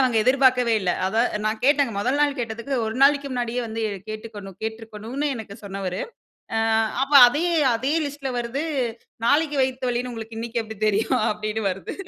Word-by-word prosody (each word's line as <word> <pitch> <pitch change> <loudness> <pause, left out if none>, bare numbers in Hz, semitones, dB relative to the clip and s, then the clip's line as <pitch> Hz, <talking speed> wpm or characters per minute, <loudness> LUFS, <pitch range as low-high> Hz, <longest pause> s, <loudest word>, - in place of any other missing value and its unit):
அவுங்க 255 -3 +2
எதிர்பார்க்கவே 255 -2 +4
இல்ல. 180 -2 0 0.2
அத 220 +4 +1 0.2
நான் 215 0 -1
கேட்டேங்க, 280 -4 +3
முதல் 255 +7 0
நாள் 290 -1 +2
கேட்டதுக்கு 235 +3 -3
ஒரு 220 - -3
நாளைக்கி 280 0 +5
முன்னாடியே 245 -1 -2
வந்து 225 0 -4 0.3
கேட்டுக்கொண் 215 -2 -7
கேட்டுருக்கணுன்னு 225 +5 -4
எனக்கு 215 -3 -8
சொன்னவரு, 195 -2 -4 0.6
ஆ - - +2 0.4
அப்ப 275 +2 -2 0.2
அதே 295 +7 -1 0.3
அதே 260 +6 -1
லிஸ்ட்ல 280 -2 -5
வருது. 240 +5 -3 0.6
நாளைக்கு 295 +1 +2
வயித்த 260 -1 -1
வலின்னு 245 +1 -2
உங்களுக்கு 225 0 -8
இன்னக்கி 235 0 -2
எப்பிடி 220 -2 -9
தெரியும்? 220 +5 +1
அப்பிடின்னு 215 -1 -2
வருது. 185 +1 -6
235 Hz, 160 wpm, -23 LUFS, 220-265 Hz, 0.6 s, நாளைக்கி